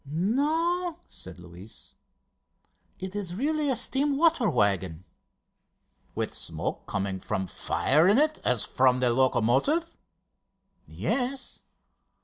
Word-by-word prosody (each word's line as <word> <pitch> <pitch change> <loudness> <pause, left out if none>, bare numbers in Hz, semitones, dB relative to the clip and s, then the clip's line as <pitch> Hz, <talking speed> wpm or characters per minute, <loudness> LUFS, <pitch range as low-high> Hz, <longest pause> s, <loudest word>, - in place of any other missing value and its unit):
"No," 310 - 0
said - - -8
Luis; 90 +4 -10 1.0
"it 190 +1 -7
is 185 -4 -3
really 300 +5 0
a 265 - +2
steam 275 +3 +2
water 320 -8 +3
waggon." 95 -4 0 1.1
"With - - -2
smoke - - -5
coming 100 -1 -2
from 95 0 -2
fire 150 - +2
in 205 +4 +5
it, 305 +2 +2
as 125 -3 +1
from 130 -1 +3
the 125 -2 +2
locomotive?" 130 - +2 0.9
"Yes." 265 +1 -2
185 Hz, 110 wpm, -27 LUFS, -, 1.1 s, in